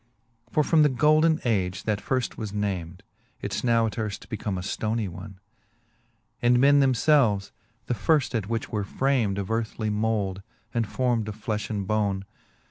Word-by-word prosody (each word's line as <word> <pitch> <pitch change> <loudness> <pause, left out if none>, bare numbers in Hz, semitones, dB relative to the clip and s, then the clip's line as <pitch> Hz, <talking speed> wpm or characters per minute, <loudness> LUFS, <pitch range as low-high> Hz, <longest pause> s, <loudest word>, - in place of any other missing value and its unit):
For 150 - +2
from 160 +1 +4
the 150 - +5
golden 155 +4 +3
age, 95 -6 0
that 105 -2 -1
firft 130 -2 -1
was 110 -3 -5
named, 95 -4 -3 0.4
It's - - -3
now 115 -2 +3
as 110 - -1
earft 105 -2 -4
become 105 -3 -3
a - - -3
ftonie 110 +3 -2
one; 95 +2 -9 1.0
•And 120 +1 +4
men 140 +3 +5
themfelves, 130 -6 +3 0.3
the - - -1
which 135 +6 +1
at 115 -3 0
firft 115 +2 -2
were 105 -3 -1
framed 120 -2 0
Of 100 +1 -3
earthly 110 -1 -1
mould, 105 -3 -1 0.3
and 115 -2 0
form'd 120 -1 0
of 105 - -5
flefh 105 -1 -3
and 100 -3 -2
bone. 100 -2 0
110 Hz, 165 wpm, -26 LUFS, 100-125 Hz, 1.0 s, the